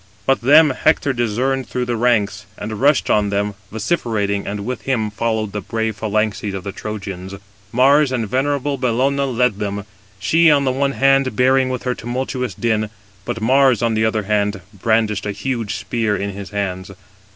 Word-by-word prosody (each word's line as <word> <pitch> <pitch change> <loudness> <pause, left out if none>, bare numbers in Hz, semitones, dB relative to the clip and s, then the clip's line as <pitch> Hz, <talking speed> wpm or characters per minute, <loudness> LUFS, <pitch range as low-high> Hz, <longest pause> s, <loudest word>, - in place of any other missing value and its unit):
But 135 0 +2
them 150 +4 +6
Hector 145 +1 +1
discerned 125 +3 -1
through 125 -1 -2
the 120 -1 -1
ranks, 105 -4 +1
and 110 0 -5
rushed 145 +1 +3
on 105 -1 +2
them, 100 +1 -1 0.2
vociferating, 110 - -1
and 100 0 -4
with 125 +2 -4
him 110 -6 -1
followed 110 -1 -1
the 105 - -4
brave 110 +2 -2
phalanxes 105 -2 -1
of 95 - -5
the 100 - -4
Trojans. 95 -2 -6 0.4
Mars 140 +3 +4
and 120 -4 -1
venerable 140 +3 -1
Bellona 135 +3 +1
led 125 -4 +1
them; 100 -1 -3 0.3
she, 160 - +4
on 145 -2 +4
the 130 - +2
one 140 +1 0
hand, 135 -3 +3
bearing 130 +1 +3
with 125 -1 -3
her 125 - 0
tumultuous 125 -2 -3
Din, 110 -2 0 0.4
but 115 - -4
Mars, 130 0 +4
on 115 -1 +2
the 110 0 +1
other, 110 -1 +1 0.5
brandished 105 0 0
a - - -1
huge 115 0 -3
spear 110 -3 -1
in 100 0 -3
his 100 -1 -8
hands. 95 -2 -3
115 Hz, 175 wpm, -19 LUFS, 105-130 Hz, 0.5 s, them